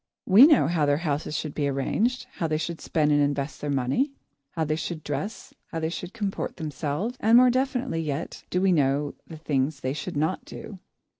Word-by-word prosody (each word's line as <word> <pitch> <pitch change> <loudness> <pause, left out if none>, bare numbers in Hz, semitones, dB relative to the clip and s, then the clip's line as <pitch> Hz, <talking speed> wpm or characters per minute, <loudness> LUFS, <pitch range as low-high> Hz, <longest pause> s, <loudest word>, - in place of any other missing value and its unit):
We 220 +9 +9
know 310 - +5
how 160 -3 +1
their 145 0 +3
houses 150 0 -1
should 155 -1 -4
be 145 -2 0
arranged, 210 - 0
how 165 - 0
they 155 -1 0
should 165 +1 -4
spend 150 -2 +1
and 145 0 +4
invest 145 0 -1
their 145 - -3
money, 140 - +1 0.4
how 165 - -1
they 155 0 0
should 160 -1 -5
dress, 155 - -5
how 165 - -4
they 160 0 -1
should 180 +1 -6
comport 205 -3 -3
themselves, 155 - -3
and 225 +2 +5
more 250 0 +7
definitely 255 -8 0
yet 150 0 -4
do 180 - 0
we 195 - +4
know 145 -2 +1
the 160 - -9
things 140 -2 -1
they 130 +1 -1
should 145 0 -5
not 160 +5 0
do. 200 -4 -9
155 Hz, 205 wpm, -26 LUFS, 145-195 Hz, 0.4 s, We